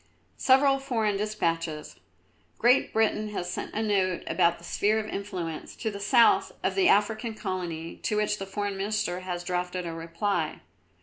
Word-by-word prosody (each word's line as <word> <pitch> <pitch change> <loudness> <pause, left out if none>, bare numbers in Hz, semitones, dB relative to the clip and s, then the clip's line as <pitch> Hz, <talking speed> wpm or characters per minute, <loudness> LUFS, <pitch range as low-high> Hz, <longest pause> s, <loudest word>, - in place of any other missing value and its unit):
"Several 270 +1 +5
foreign 225 -6 0
despatches. 165 -7 -2 0.6
Great 245 +3 +4
Britain 215 -1 +1
has 180 -3 -3
sent - - -5
a 220 - 0
note 190 -4 +1
about 170 0 +2
the - - -18
Sphere 210 +5 +1
of 220 - -1
Influence 185 -7 -5
to 220 - -3
the 200 - -7
south 230 +3 +4
of - - +1
the 380 -2 +3
African 220 +2 +2
Colony, 175 -5 -4
to 210 - -2
which 210 0 0
the 195 - -5
Foreign 200 0 -3
Minister 200 -2 -1
has 180 -1 -4
drafted 180 0 -2
a 165 - -4
reply." 165 +5 -2
200 Hz, 165 wpm, -27 LUFS, 180-215 Hz, 0.6 s, Several